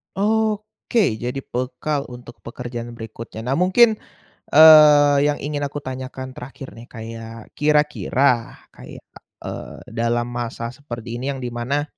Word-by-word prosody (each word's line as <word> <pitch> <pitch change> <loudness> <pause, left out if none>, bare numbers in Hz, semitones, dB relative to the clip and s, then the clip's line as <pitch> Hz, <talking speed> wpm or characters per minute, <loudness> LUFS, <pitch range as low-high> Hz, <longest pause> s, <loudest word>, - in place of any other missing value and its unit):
Oke, 215 - 0
jadi 125 +3 -4
bekal 140 +3 -3
untuk 125 0 -12
pekerjaan 120 0 -7
berikutnya. 110 0 -8
Nah 125 - -3
mungkin, 215 +5 +4 0.6
eee, 150 -2 +8
yang 150 - +1
ingin 145 0 -2
aku 145 +1 -6
tanyakan 130 0 -6
terakhir 130 +1 -9
nih 115 +1 -12
kayak 115 0 -9
kira-kira 150 -4 +1 0.2
kayak, - - -12 0.4
eee, - - -7
dalam 115 +1 0
masa 120 -1 -4
seperti 120 -3 -7
ini 135 +3 -2
yang 130 - -8
di 120 - -4
mana, 125 +5 -1
130 Hz, 130 wpm, -21 LUFS, 120-150 Hz, 0.6 s, eee